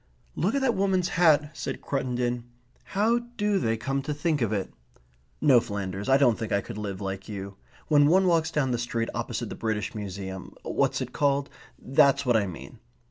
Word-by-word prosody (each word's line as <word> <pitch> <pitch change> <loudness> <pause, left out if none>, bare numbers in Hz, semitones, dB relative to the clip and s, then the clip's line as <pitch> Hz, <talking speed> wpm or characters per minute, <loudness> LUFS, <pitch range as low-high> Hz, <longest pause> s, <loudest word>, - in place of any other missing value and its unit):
"Look 195 - 0
at 275 - +1
that 260 -3 +2
woman's 190 -3 +1
hat," 155 -4 +3
said 130 - -4
Cruttendon. 125 -3 -1 0.4
"How 220 +5 +2 0.2
do 205 -2 +1
they 115 -2 0
come 135 +4 -2
to 145 +2 -3
think 150 -1 0
of 115 -3 +1
it?... 100 -3 -2 0.7
No, 135 -5 +6
Flanders, 100 -3 -4
I 135 - +6
don't 125 -5 +3
think 115 - -4
I 100 - +3
could 100 - -7
live 100 -2 -5
like 95 +1 -5
you. 100 -1 -6 0.3
When 145 -2 +5
one 185 +4 +4
walks 165 -3 +3
down 135 -4 0
that 120 - 0
street 115 -1 -2
opposite - - -3
the - - -5
British 110 -3 -2
Museum 95 -3 -6
what's - - 0
it - - -5
called? 140 -1 +1 0.3
that's 140 +1 +3
what 120 -2 +3
I 105 -3 +2
mean. 90 - -9
125 Hz, 190 wpm, -27 LUFS, 105-150 Hz, 0.7 s, No